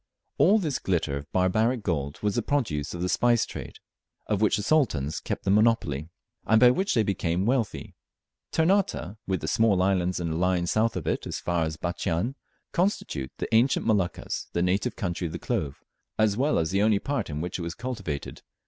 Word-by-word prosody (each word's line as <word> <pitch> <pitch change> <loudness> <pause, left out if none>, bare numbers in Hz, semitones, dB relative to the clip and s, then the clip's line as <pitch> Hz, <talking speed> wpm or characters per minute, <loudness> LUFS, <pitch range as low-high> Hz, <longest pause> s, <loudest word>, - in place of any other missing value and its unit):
All 200 +6 +6
this 155 -10 -1
glitter 80 -6 0
of 70 +2 -7
barbaric 110 +6 +1
gold 70 -6 -2
was 105 -1 +1
the 120 - 0
produce 105 - -1
of 85 - -4
the - - +1
spice 120 +4 +3
trade, - - -8 0.5
of 105 -1 -1
which 105 -1 +3
the 105 - -3
Sultans 90 - +1
kept - - -4
the 95 - +1
monopoly, 100 -9 +2 0.3
and 110 0 +4
by 125 +1 +7
which 190 +10 0
they 115 - +4
became 90 -2 -1
wealthy. 120 -2 -1 0.6
Ternate, 165 - +1
with 95 -1 -1
the - - -4
small 110 -5 +3
islands 90 -2 +1
in 85 -1 -2
a - - -2
line 90 0 +1
south 110 +6 +1
of - - -4
it, - - -1
as - - -3
far 85 -2 0
as 80 0 -4
Batchian, 85 +6 -2 0.4
constitute 170 - -1
the - - -4
ancient 120 +4 +3
Moluccas, 100 -6 -1
the 85 - +1
native 90 +3 0
country 90 -2 -2
of 80 - -8
the - - -3
clove, 70 -4 -3 0.3
as 110 -2 +3
well 140 +6 +1
as 80 0 0
the 100 +1 +2
only 105 -1 +4
part 140 +2 -2
in 75 0 -4
which 90 +3 -4
it - - -4
was 85 0 -4
cultivated. 100 - -5
100 Hz, 200 wpm, -26 LUFS, 85-115 Hz, 0.6 s, by